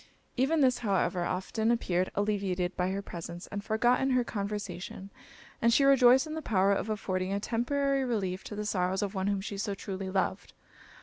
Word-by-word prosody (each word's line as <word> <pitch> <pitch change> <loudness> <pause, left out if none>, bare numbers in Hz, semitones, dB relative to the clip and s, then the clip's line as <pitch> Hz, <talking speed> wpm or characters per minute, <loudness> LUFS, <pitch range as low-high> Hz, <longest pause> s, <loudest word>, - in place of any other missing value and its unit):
Even 285 +5 +2
this, 255 -2 +3
however, 190 -5 0
often 205 +5 -1
appeared 185 -6 +1
alleviated 195 -3 -1
by 180 0 0
her 195 +1 -3
presence, 170 -1 -7
and 205 0 -4
forgotten 240 +5 +2
in 260 - +2
her 250 - +3
conversation; 200 -3 -5 0.5
and 235 - +4
she 275 - +4
rejoiced 265 0 +6
in 310 - -6
the 315 - -4
power 200 -6 +2
of 200 - -2
affording 190 -3 -2
a 200 - 0
temporary 275 +5 0
relief 195 -7 -2
to 210 - -6
the 210 0 -4
sorrows 190 -1 0
of 200 0 -3
one 190 -1 -1
whom 200 -1 0
she 200 0 -5
so 200 -1 -2
truly 190 -1 -5
loved. 190 0 -2
200 Hz, 190 wpm, -30 LUFS, 190-240 Hz, 0.5 s, rejoiced